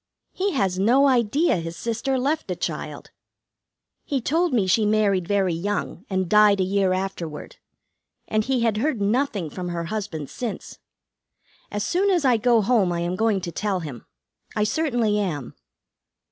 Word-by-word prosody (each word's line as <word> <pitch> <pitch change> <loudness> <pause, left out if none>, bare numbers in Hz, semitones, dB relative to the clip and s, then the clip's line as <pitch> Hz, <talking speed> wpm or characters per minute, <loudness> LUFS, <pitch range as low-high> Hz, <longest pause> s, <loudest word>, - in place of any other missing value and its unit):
"He 390 0 -1
has 190 -8 0
no 255 +8 +4
idea 260 - +2
his 165 0 -5
sister 235 +6 -1
left 290 +5 -1
a - - -1
child. - - -5 0.9
He 280 -3 -1
told 330 +7 +1
me 225 -6 +2
she 190 +4 +3
married 205 -4 +2
very 195 -3 +1
young, 200 +3 -3
and 190 -2 0
died 210 0 +5
a - - +3
year 190 0 +1
afterward; 185 -5 -4 0.7
and 215 0 +1
he 255 +1 0
had 225 -2 +1
heard 260 0 0
nothing 205 - 0
from 180 -1 -5
her 170 -1 -3
husband 185 -9 -4
since. 235 -5 -6 0.9
As 205 0 -3
soon 375 - +1
as 350 -6 +2
I 250 -3 +4
go 230 -1 +3
home 205 -5 +2
I 170 0 -1
am 175 +1 -1
going 215 -1 +1
to 170 - -5
tell 195 0 -2
him. 140 -8 -8 0.5
I 210 - +2
certainly 230 -3 +1
am." 150 - -3
210 Hz, 165 wpm, -24 LUFS, 185-250 Hz, 0.9 s, died